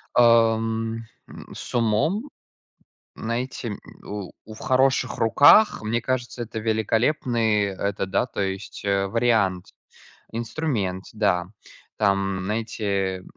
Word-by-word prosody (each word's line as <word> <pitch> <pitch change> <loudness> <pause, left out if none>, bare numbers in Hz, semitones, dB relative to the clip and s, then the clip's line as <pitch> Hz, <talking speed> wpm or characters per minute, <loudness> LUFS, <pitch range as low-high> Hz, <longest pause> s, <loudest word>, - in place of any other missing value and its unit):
Ам, 115 -1 +3 0.2
м, - - -12
с - - -8
умом. 120 - +1 0.9
Найти, 120 +2 -4
м, 105 - -6 0.2
у 100 -3 -6
у 110 - -10
в 110 - -12
хороших 130 -1 +2
руках, 145 - +6
мне 115 +2 -1
кажется, 125 0 -3
это 115 -1 -6
великолепный, 110 0 +1
это 100 0 -2
да, 95 +5 0
то 115 - -5
есть, 95 0 -4
э, 100 -1 +1
вариант. 110 -5 +1 0.7
Инструмент, 115 - -2
да. 100 -5 +1 0.5
Там, 100 -2 +1
знаете, 100 -3 -2
110 Hz, 110 wpm, -24 LUFS, 100-120 Hz, 0.9 s, руках